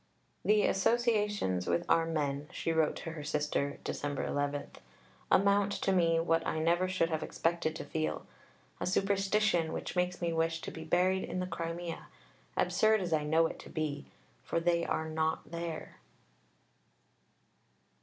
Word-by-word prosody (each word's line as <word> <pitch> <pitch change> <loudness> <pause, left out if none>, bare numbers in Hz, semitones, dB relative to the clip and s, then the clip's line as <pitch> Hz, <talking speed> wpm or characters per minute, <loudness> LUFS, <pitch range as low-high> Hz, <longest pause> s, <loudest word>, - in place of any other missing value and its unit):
"The 210 0 +4
associations 210 - +1
with 175 - +1
our 165 0 +3
men," 145 -3 -1
she 165 - -2
wrote 160 -2 +2
to 165 - -6
her 155 -2 -7
sister 150 -1 -1
(Dec. 145 -1 -2
11), 145 0 -2 0.6
"amount 200 +1 +4
to 195 - 0
me 170 -3 +3
to 165 - +1
what 165 0 +2
I - - -1
never 170 +3 +2
should 185 -3 0
have 160 -1 -1
expected 165 -1 -1
to - - -5
feel 80 - -2 0.5
a - - -2
superstition, 195 -2 +2
which - - -4
makes 180 0 0
me 170 -1 -1
wish 165 0 0
to - - -5
be 160 - -7
buried 185 +3 +2
in 185 - -4
the 180 - -1
Crimea, 165 -1 -5 0.5
absurd 220 0 +3
as 175 -3 -1
I 155 -1 +2
know 160 +2 +4
it - - -4
to - - -11
be. 150 -3 -3 0.4
_For - - +1
they 170 0 +2
are 160 - -1
not 160 -1 -1
there. 170 -1 -5
165 Hz, 160 wpm, -32 LUFS, 155-185 Hz, 0.6 s, The